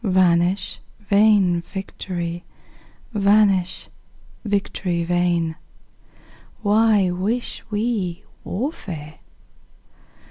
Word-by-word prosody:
Vanish 185 -1 +2 0.2
vain 200 -4 +4
victory! 175 -2 -5 0.7
vanish, 200 -3 +3 0.6
victory 195 -4 -1
vain! 170 -2 +1 1.1
Why 210 -2 +4
wish 210 +7 -2
we 205 -4 -2 0.2
warfare? 180 - -5
190 Hz, 60 wpm, -22 LUFS, 175-210 Hz, 1.1 s, vain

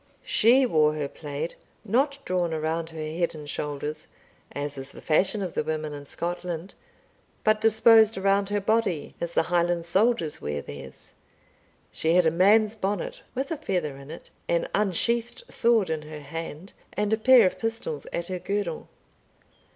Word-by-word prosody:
She 250 +5 +5
wore 155 -8 +3
her 150 -2 -2
plaid, 150 +2 -5 0.3
not 270 +7 +1
drawn 175 -3 0
around 160 +1 -2
her 160 -1 -9
head 165 +2 -2
and 150 -1 -9
shoulders, 150 +1 -4 0.4
as 145 0 -4
is 135 0 -6
the - - -11
fashion 190 +6 +1
of 180 - -4
the - - 0
women 155 -1 -3
in 145 -1 -9
Scotland, 175 +2 -4 0.7
but 215 0 +3
disposed 220 0 +6
around 195 +1 +2
her 205 0 +1
body 205 -6 0
as 170 0 -3
the - - +3
Highland 175 -1 +2
soldiers 190 -2 +1
wear 75 -1 -3
theirs. 70 -2 -11 0.8
She 165 +2 +1
had 180 -1 +5
a 160 - +4
man's 205 +5 +4
bonnet, 220 - -3
with 270 +4 -2
a 325 - -1
feather 180 - -2
in 140 +1 -12
it, 165 - -10 0.2
an 170 0 +1
unsheathed 230 - 0
sword 230 -7 +2
in 160 -1 -2
her 150 0 -9
hand, 165 +4 -7 0.2
and 210 +1 0
a - - +6
pair 250 +1 +7
of 185 - 0
pistols 225 -10 -3
at 170 - -2
her 185 0 -4
girdle. 200 +2 -3
175 Hz, 165 wpm, -26 LUFS, 155-215 Hz, 0.8 s, pair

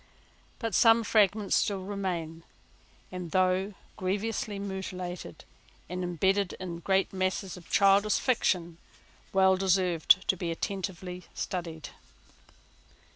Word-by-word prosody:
But 225 -3 -3
some 225 +3 +5
fragments 210 -1 +3
still 195 -2 0
remain, 180 -5 -4 0.7
and, 180 -2 -6
though 185 +3 +1 0.2
grievously 205 +2 -2
mutilated, 185 - -6 0.4
and 180 +2 -4
imbedded 190 +2 +1
in 175 -2 -6
great 190 +3 +1
masses 185 0 -2
of 180 -3 -14
childish 200 +1 +4
fiction, 175 -9 0 0.5
well 190 0 +5
deserve 185 -3 +1
to 190 +1 +5
be 175 -1 -4
attentively 180 0 -4
studied. 165 -4 -4
185 Hz, 105 wpm, -29 LUFS, 180-200 Hz, 0.7 s, some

